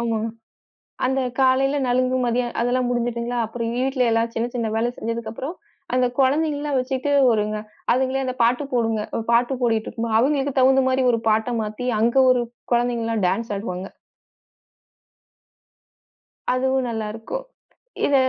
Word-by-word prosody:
ஆமா. 230 -1 0 0.9
அந்தக் 255 -1 0
காலையில 270 +2 +3
நலுங்கு. 255 +1 +2
மதியம் 240 0 0
அதெல்லாம் 245 +1 +1
முடிஞ்சுட்டுங்களா. 240 0 -1
அப்புறம் 230 0 -4
வீட்டுல 260 0 +1
எல்லாம் 230 +1 +1
சின்ன, 230 +1 0
சின்ன 230 -3 -1
வேலை 230 +2 +1
செஞ்சதுக்கப்புறம், 230 +6 -4 0.4
அந்த 255 0 +3
குழந்தைகள்லாம் 290 0 +1
வச்சிட்டு 260 +2 -2 0.2
வருங்க. 215 -1 0 0.4
அதுங்களே 265 +1 0
அந்த 255 - -2
பாட்டு 245 +4 +2
போடுங்க. 225 -3 +1 0.2
ஒரு 225 - -4
பாட்டு 240 +3 +3
ஓடிட்டு 225 -2 +1
இருக்குமா, 230 -1 -3
அவங்களுக்கு 275 +1 +1
தகுந்த 265 +1 +5
மாரி 260 0 +1
ஒரு 230 - 0
பாட்ட 220 +3 +1
மாத்தி, 215 +3 -5
அங்க 235 +4 +3
ஒரு 250 -1 +3 0.3
குழந்தைங்கலாம் 230 -3 +1
டேன்ஸ் 205 +4 -1
ஆடுவாங்க! 190 -2 -5 2.6
அதுவும் 260 0 +1
நல்லா 220 -2 -3
இருக்கும். 370 - -5 0.6
இத 285 - +1
245 Hz, 135 wpm, -22 LUFS, 230-260 Hz, 2.6 s, தகுந்த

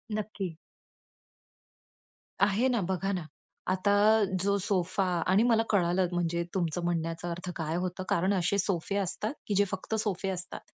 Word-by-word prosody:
नक्की. 195 -6 -4 1.9
आहे 215 +6 +2
ना, 235 -4 +1
बघा 195 +1 0
ना, 185 -3 -1 0.5
आता 190 +2 +1 0.5
जो 200 0 +2
सोफा 190 -1 0 0.2
आणि 195 +5 +4
मला 225 -2 +4
कळालं, 180 -2 +2
म्हणजे 170 -1 0
तुमचं 175 -2 -1
म्हणण्याचा 165 0 -2
अर्थ 175 +2 -5
काय 160 -1 -2
होतं. 180 +1 -2
कारण 185 +4 +2
असे 190 +2 +1
सोफे 195 0 -1
असतात, 200 +5 -2
की 205 - 0
जे 205 - +5
फक्त 190 +3 -3
सोफे 195 -2 -1
असतात 185 -1 -5
185 Hz, 145 wpm, -29 LUFS, 175-200 Hz, 1.9 s, जे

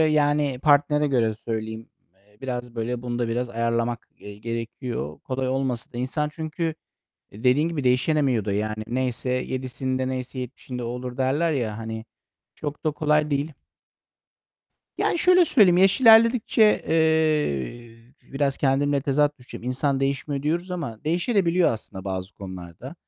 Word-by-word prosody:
yani, 145 -3 +2
partnere 150 0 +4
göre 115 -5 +1
söyleyeyim, 110 0 -5 0.3
eee, 105 +2 -29
biraz, 125 -2 -5
böyle, 120 +1 -3
bunu 120 -1 -3
da 120 -2 0
biraz 120 +1 -1
ayarlamak, 115 0 -1
eee, 105 0 -10
gerekiyor. 115 - -5
Kolay 130 0 -3
olmasa 130 -3 -2
da 120 - -6
insan 150 +4 -1
çünkü 160 +1 -3 0.6
dediğin 125 +9 +2
gibi 150 -5 -3
değişemiyor 125 -2 +2
da, 100 - -1
yani. 110 +1 -2
Neyse 125 +1 -2
yedisinde 130 0 -2
neyse 130 0 -5
yetmişinde 125 0 -6
o - - -3
olur 125 +1 -5
derler, 145 +5 +1
ya, 115 -6 -2
hani, 110 0 -6 0.5
çok 145 0 -6
da 155 - +3
kolay 150 0 +1
değil. 145 +2 -1 1.4
Yani, - - +1
şöyle 360 +1 +6
söyleyeyim, 205 - +5
yaş 195 +5 +4
ilerledikçe, 225 -2 +6
eee, 130 - 0 0.2
biraz 140 0 0
kendimle 140 +1 +2
tezat 145 +1 +1
düşeceğim. 125 -1 -10
İnsan 135 +2 0
değişmiyor 140 +1 -1
diyoruz 170 +5 -1
ama 145 -10 -5
değişebiliyor 175 +1 +2
da - - +1
aslında 100 -3 -8
bazı 95 0 -4
konularda. 95 - -9
130 Hz, 145 wpm, -24 LUFS, 115-150 Hz, 1.4 s, şöyle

